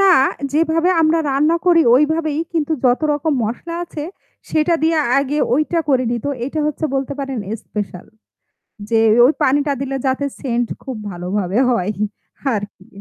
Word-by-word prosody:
না 390 -1 +6 0.4
যেভাবে 330 +3 +2
আমরা 320 +1 +3
রান্না 300 +5 +2
করি 335 -2 +6
ওইভাবেই। 310 +2 +1
কিন্তু 320 -1 0
যত 245 0 +3
রকম 295 +2 0
মসলা 290 +10 -4
আছে 305 -3 -7 0.5
সেটা 315 +2 +2
দিয়ে 320 0 +2 0.2
আগে 280 +2 -1 0.2
ওইটা 310 +4 +1
করে 255 -2 +3
নিত। 235 +1 -3 0.2
এইটা 305 +3 -3
হচ্ছে 300 +1 -3
বলতে 270 +1 -1
পারেন 270 -3 -4 0.2
স্পেশাল 205 -4 -6 0.8
যে 225 -1 +3 0.3
ওই 275 - +4
পানিটা 285 +1 +2
দিলে 270 0 -2
যাতে 265 +2 0
scent 240 -3 -1 0.2
খুব 260 -4 -5
ভালোভাবে 185 +4 -2
হয়। 210 -3 0 0.6
আরকি। 200 -2 -7
280 Hz, 150 wpm, -19 LUFS, 240-315 Hz, 0.8 s, না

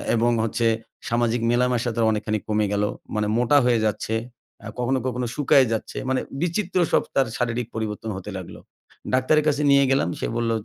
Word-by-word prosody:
এবং 120 +1 +2
হচ্ছে 115 +1 0 0.4
সামাজিক 120 0 +1
মেলামেশা 120 0 +1
তার 115 -1 +2
অনেকখানি 110 0 -1
কমে 105 -1 +1
গেলো। 105 0 +1 0.3
মানে 105 -1 0
মোটা 125 +4 +4
হয়ে 120 -2 +3
যাচ্ছে, 110 +1 -1 0.5
আ - - -5
কখনো, 130 +2 +1
কখনো 125 0 -2
শুকায়ে 140 -2 +4
যাচ্ছে। 110 - -4
মানে 130 -1 +1 0.2
বিচিত্র 180 +2 -1
সব - - +3
তার 135 -2 +3
শারীরিক 120 -1 -1
পরিবর্তন 110 0 -4
হতে 95 +2 -8
লাগলো। 90 - -9 0.5
ডাক্তারের 130 +4 +3
কাছে 150 -1 +1
নিয়ে 140 0 +5
গেলাম। 135 -10 +2
সে - - -2
বলল 115 -1 0
120 Hz, 175 wpm, -23 LUFS, 110-130 Hz, 0.5 s, নিয়ে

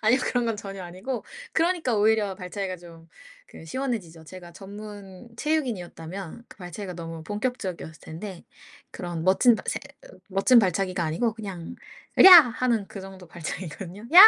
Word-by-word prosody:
아니요. 235 +5 +5
그런 245 -1 +1
건 225 -2 0
전혀 195 -2 -7
아니고 190 +8 -5 0.3
그러니까 325 -8 +1
오히려 210 -2 +3
발차기가 185 0 -4
좀 165 -1 -14 0.4
그 - - -13
시원해지죠. 175 -7 -4
제가 175 0 -11
전문 205 +1 -10
체육인이었다면 200 - -3
그 - - -15
발차기가 180 0 -7
너무 165 -1 -7
본격적이었을 195 - -4
텐데 175 +3 -8 0.5
그런 175 -2 -5
멋진 195 +7 +5
바 - - -5
세 - - 0 0.5
멋진 195 +6 +5
발차기가 185 -3 +1
아니고 215 +9 0
그냥 195 -6 -7 0.4
"으랴!" 380 - +11 0.2
하는 230 -4 0
그 200 - -8
정도 190 -1 -11
발차기거든요. 175 +5 -7
"야! 365 - +12
195 Hz, 360 characters per minute, -26 LUFS, 175-225 Hz, 0.5 s, 야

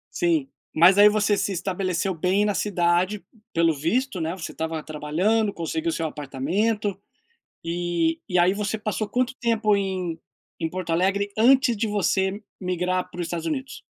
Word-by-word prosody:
Sim, 325 -6 +1 0.3
mas 175 +4 +6
aí 205 +1 +9
você 210 -1 +2
se - - -1
estabeleceu 185 0 -1
bem 185 +5 +1
na 205 - +1
cidade, 180 +1 +1 0.3
pelo 165 -1 +3
visto, 185 - -1
né, 165 +2 -2
você 180 - -6
estava 160 0 -3
trabalhando, 185 +9 0
conseguiu 320 - -2
seu 165 - -2
apartamento. 185 +10 -2 0.6
E 170 -1 -1
e 180 - 0
aí 180 +2 +4
você 210 +1 -2
passou 215 0 -2
quanto 250 +4 0
tempo 225 -3 +2
em 185 -4 -2 0.4
em 165 - -1
Porto 180 -1 -4
Alegre, 195 +4 +1
antes 260 +2 +5
de 220 +1 -1
você 195 0 0 0.2
migrar 180 0 -1
para 175 - -9
o - - 0
Estados 170 -1 -4
Unidos? 260 +12 -4
185 Hz, 160 wpm, -24 LUFS, 170-210 Hz, 0.6 s, aí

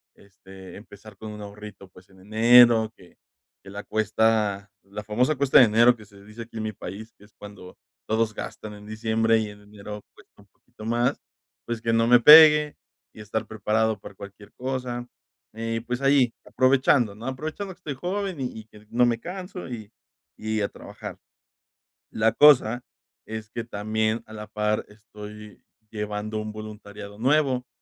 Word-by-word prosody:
este, 95 -1 -14
empezar 105 0 -14
con 110 +2 -9
un 105 - -9
ahorrito, 100 -1 -11
pues, 90 0 -19
en 95 -1 -20
enero 115 +1 +5
que 90 - -19 0.4
que - - -14
la 100 +1 -7
cuesta 110 -2 0
la 100 +2 -8
famosa 125 +8 +1
cuesta 140 0 +5
de 125 - +9
enero, 115 +3 +5
que 110 - -14
se 100 -1 -18
dice 105 +3 -9
aquí 115 0 -18
en 110 - -3
mi 110 - -3
país, 110 +3 -9
que 105 - -18
es 105 - -25
cuando 100 -3 -12 0.3
todos 110 0 0
gastan 105 0 -7
en 105 0 -13
diciembre, 110 +1 +1
y 110 -1 -3
en 105 - -13
enero 105 0 -10
cuesta - - -21
un - - -23
poquito 110 - -15
más, 120 +2 0 0.4
pues, 120 -1 -4
que 115 0 0
no 115 0 +2
me 120 0 +6
pegue, 150 +1 +8 0.4
y - - -15
estar 105 +1 -4
preparado 110 0 -1
para 100 - -12
cualquier 100 +1 -13
cosa. 125 -1 -4 0.5
Eh, 115 +1 -3
pues 125 +1 -3
ahí 135 -4 +3
aprovechando, 130 -4 +2
¿no?, 110 +3 -10
aprovechando 155 +9 -5
que 170 - -27
estoy 150 -6 -6
joven, 185 +3 -4
y 125 -4 -5
y - - -20
que 105 -1 -19
no 120 +1 +3
me 115 -1 0
canso, 180 - -7
y 110 -3 -8 0.5
y 110 0 -2
a 100 - -1
trabajar. - - -10 0.9
La 110 +1 +2
cosa, 125 -3 +5 0.5
es 110 -1 -7
que 115 - -4
también 110 +1 -2
a 110 - -14
la 105 -1 -8
par, 105 0 -1
estoy 105 0 -12 0.3
llevando 105 0 -4
un 110 0 -5
voluntariado 105 -1 -10
nuevo, 130 -1 +1
110 Hz, 175 wpm, -25 LUFS, 105-120 Hz, 0.9 s, de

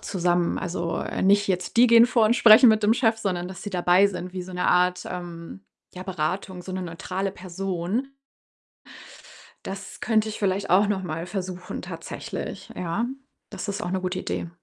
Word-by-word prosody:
zusammen. 175 -2 0
Also, 170 -2 -3
äh, - - -3
nicht 200 +1 +4
jetzt 180 +2 -2
die 245 - +8
gehen 230 0 +7
vor 240 -2 +3
und 235 +3 +3
sprechen 230 +2 +8
mit 215 0 +2
dem 220 +2 +4
Chef, 225 -2 +2
sondern 180 -4 -2
dass 190 - -9
die 205 - -5
dabei 180 +1 +4
sind 185 -2 -6
wie 185 - -3
so 185 +1 -10
'ne 180 0 -1
Art, 180 0 +2
ähm, 175 +1 -8 0.3
ja, 180 - -7
Beratung, 185 +1 -3
so 190 - -9
'ne 185 0 -3
neutrale 185 +3 -4
Person. 190 +5 -3 1.6
Das 195 0 -8
könnte 220 -1 +2
ich 215 - -6
vielleicht 195 0 -1
auch 195 +4 +5
noch 195 -2 -1
mal 165 0 -4
versuchen 180 -1 -5
tatsächlich, - - -7
ja. 180 +6 -2 0.4
Das 200 0 -6
ist 200 +2 -3
auch 195 - -3
'ne 190 0 -1
gute 185 0 -2
Idee. 170 - -4
185 Hz, 185 wpm, -25 LUFS, 180-205 Hz, 1.6 s, die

